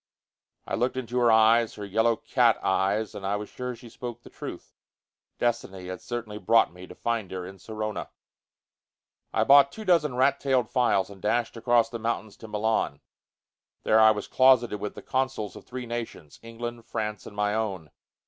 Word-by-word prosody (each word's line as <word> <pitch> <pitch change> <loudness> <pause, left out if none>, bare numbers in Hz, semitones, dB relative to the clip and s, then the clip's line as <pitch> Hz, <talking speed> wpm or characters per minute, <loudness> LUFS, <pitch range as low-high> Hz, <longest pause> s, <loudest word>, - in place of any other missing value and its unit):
I - - -6
looked 125 +2 0
into 125 -1 -2
her 120 -1 +5
eyes, 110 +1 +4
her 105 - -6
yellow 110 +4 +2
cat - - +2
eyes, 100 +2 +1
and 100 - -8
I 100 +1 0
was 105 0 -5
sure 125 0 -5
that - - -10
she 120 - -13
spoke 120 0 -8
the - - -14
truth. - - -8 0.6
Destiny 95 -6 -2
had 95 -1 -6
certainly 115 -3 -5
brought 110 -1 +3
me 90 +1 -11
to - - -12
find 115 -5 -2
her 90 -1 -5
in 95 +1 -10
Sorona. 110 0 -5 1.2
I - - +2
bought 140 0 +7
two 220 +6 -9
dozen 160 -8 +3
rat 135 +2 +3
tailed 130 -4 +1
files, 105 -6 +2
and 95 -2 -13
dashed 120 +3 0
across 120 0 +2
the 115 - -5
mountains 110 -2 -3
to 110 - -10
Milan. 110 +1 0 0.8
There 110 - +4
I 110 0 +8
was 105 -2 -1
closeted 125 -5 +4
with 105 - -5
the - - -9
consuls 130 -7 -2
of - - -11
three 125 0 -6
nations: 115 -10 -6
England, 115 0 -7
France 105 -2 -4
and 105 - -11
my 105 0 0
own. 95 -9 -3
115 Hz, 185 wpm, -27 LUFS, 105-120 Hz, 1.2 s, I